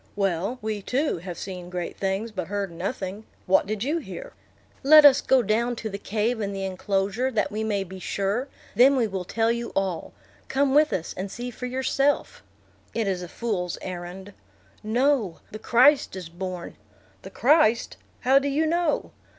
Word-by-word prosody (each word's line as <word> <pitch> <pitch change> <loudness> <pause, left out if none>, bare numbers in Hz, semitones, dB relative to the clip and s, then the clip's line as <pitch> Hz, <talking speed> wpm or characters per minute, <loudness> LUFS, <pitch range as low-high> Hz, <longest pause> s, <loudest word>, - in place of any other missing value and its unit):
"Well, 195 +3 -1
we, 215 -1 -2
too, 265 - -1
have 175 -1 -7
seen 180 -2 -7
great 180 -1 -4
things, 195 +4 -2
but 185 -5 -4
heard 200 -2 -3
nothing. 190 +3 -4 0.2
What 190 +1 +3
did 215 0 -2
you 305 +6 0
hear?" - - -9 0.5
"Let 305 +2 +8
us 280 -1 +8
go 260 -2 +3
down 235 +3 +1
to 220 -2 -5
the 200 - -5
cave 220 +3 -1
in 200 -1 -2
the 195 0 -3
enclosure, 195 +5 -1
that 210 -5 0
we 215 +1 -2
may 205 -3 0
be 190 0 -10
sure; 200 +8 -1 0.3
then 265 +4 +6
we 250 -3 +2
will 190 -3 -4
tell 225 +4 +1
you 235 0 -3
all. 190 -3 -1 0.4
Come 270 0 +1
with 300 +1 +5
us, 170 - -3
and 190 +2 -4
see 245 +4 -6
for 250 +2 -6
yourself." 270 +2 0 0.5
"It 225 -3 0
is 185 -2 -1
a 180 - -6
fool's 185 -7 -3
errand." 185 +2 -7 0.5
"No, 230 - +1
the 215 - -7
Christ 255 +2 +4
is 180 -3 -7
born." 180 0 -6 0.4
"The - - -9
Christ! 255 -4 +3 0.2
How 265 +2 +5
do 280 - -2
you 290 +3 +1
know?" 335 -1 0
215 Hz, 180 wpm, -25 LUFS, 190-255 Hz, 0.5 s, Let